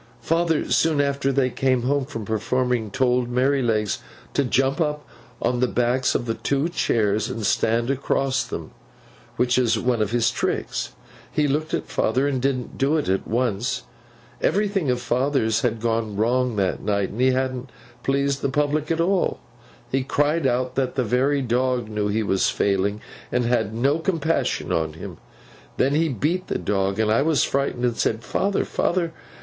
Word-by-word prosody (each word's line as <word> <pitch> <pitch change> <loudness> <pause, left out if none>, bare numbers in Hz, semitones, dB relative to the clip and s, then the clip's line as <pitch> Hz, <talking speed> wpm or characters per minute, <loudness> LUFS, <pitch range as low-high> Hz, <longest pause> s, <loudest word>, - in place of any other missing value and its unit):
'Father, 165 -1 +1
soon 160 -3 +3
after 140 -1 +1
they 130 -1 +1
came 130 -2 +1
home 140 +1 +1
from 115 -7 -6
performing, 115 +1 0
told 125 +1 +1
Merrylegs 125 -5 +1 0.3
to 140 - +2
jump 135 +4 +1
up 150 -1 -1 0.3
on 125 0 0
the 125 - +3
backs 125 +2 +1
of - - 0
the 115 - -1
two 140 +7 -1
chairs 105 - +1
and 110 -2 -4
stand 115 +5 +1
across 135 0 0
them—which 125 0 -4
is 115 -3 +2
one 120 0 0
of 105 - +1
his 115 0 +2
tricks. - - -2 0.4
He 150 -1 +1
looked 155 +3 0
at - - -3
father, 130 +6 +1
and 135 -3 -1
didn't 130 -2 -2
do 140 +4 +2
it 150 - -1
at 95 0 0
once. 125 +2 -1 0.6
Everything 200 -6 +1
of 125 -1 +1
father's 125 -2 +1
had 115 -2 0
gone 115 -2 -1
wrong 120 +3 +1
that 95 -3 0
night, 100 -1 0
and 115 - -5
he 130 - +5
hadn't 130 0 -1 0.3
pleased 140 0 0
the - - 0
public 150 +2 0
at 165 0 0
all. 185 +2 +1 0.5
He 135 - +1
cried 145 +2 +1
out 125 0 0
that 130 -1 -1
the 130 - +1
very 130 +5 +1
dog 125 -1 0
knew 105 -1 -1
he 110 +2 0
was 95 -2 +2
failing, 100 +1 0 0.3
and 125 -1 +1
had 115 -3 +1
no 135 +7 +1
compassion 165 -2 0
on 80 -1 0
him. 80 - -8 0.6
Then 135 - +2
he 160 +2 +2
beat 160 - -1
the - - -1
dog, 100 -1 -1
and 110 -1 +2
I 115 - +3
was 155 0 +3
frightened, 135 -3 0
and 120 -2 0
said, 110 +1 0
"Father, 200 0 0
father! 170 -2 0
125 Hz, 175 wpm, -23 LUFS, 115-140 Hz, 0.6 s, he